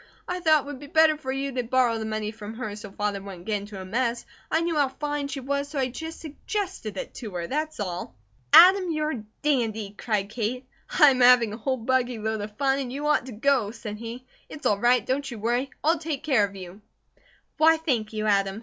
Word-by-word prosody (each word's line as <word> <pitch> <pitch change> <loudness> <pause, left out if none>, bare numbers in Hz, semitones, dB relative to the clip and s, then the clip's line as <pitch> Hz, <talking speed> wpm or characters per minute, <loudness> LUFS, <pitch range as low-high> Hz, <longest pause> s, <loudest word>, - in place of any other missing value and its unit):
I 360 0 -2
thought 315 -4 +4
it - - -15
would 285 -2 -7
be 290 - -10
better 315 +1 +5
for 265 -3 -5
you 275 +1 -2
to 255 -1 -1
borrow 240 -1 +1
the 220 - -4
money 215 -1 -3
from 220 0 -9
her, 215 -4 -5
so 210 -1 -9
Father 205 0 -2
wouldn't 190 -3 -10
get 215 -1 0
into 200 0 -8
a 190 - -7
mess, 235 +4 -1 0.3
and - - +2
I - - +1
knew 335 -1 -1
how 290 -2 +3
fine 290 +1 -3
she 280 -1 -5
was, 280 +2 -2
so 295 - -6
I 260 -1 +1
just 320 +6 -7
SUGGESTED 315 - -5
it 275 - -5
to 230 - -7
her. 170 -1 -2
That's 305 - -3
all!" 180 -3 -4 0.4
"Adam, 370 0 +8
you're 310 -1 -1
a 235 -8 -5 0.2
dandy!" 225 -8 0
cried 205 -2 -2
Kate. 245 +3 -3 0.2
"I 295 -4 +6
am 255 -1 0
having 245 -3 +6
a - - -5
whole 260 +3 -1
buggy 250 0 0
load 220 0 -2
of 210 0 -8
fun, 275 -1 +2
and 255 -3 -4
you 285 +3 -4
ought 300 -4 +2
to - - -7
go," 240 -1 +1
said 210 -2 -7
he. 235 +3 -8 0.2
"It's 310 - -10
all 200 - +2
right! 245 +3 +3
Don't 275 +2 -1
you 240 - -7
worry! 240 +5 0
I'll 320 +2 +3
take 310 -3 -4
care 265 -10 +3
of 200 0 -10
you." 185 +1 -10 0.8
"Why, 320 +1 +6
thank 255 -10 -1
you, 215 -1 -3
Adam!" 200 -1 +1
250 Hz, 240 wpm, -26 LUFS, 215-290 Hz, 0.8 s, Adam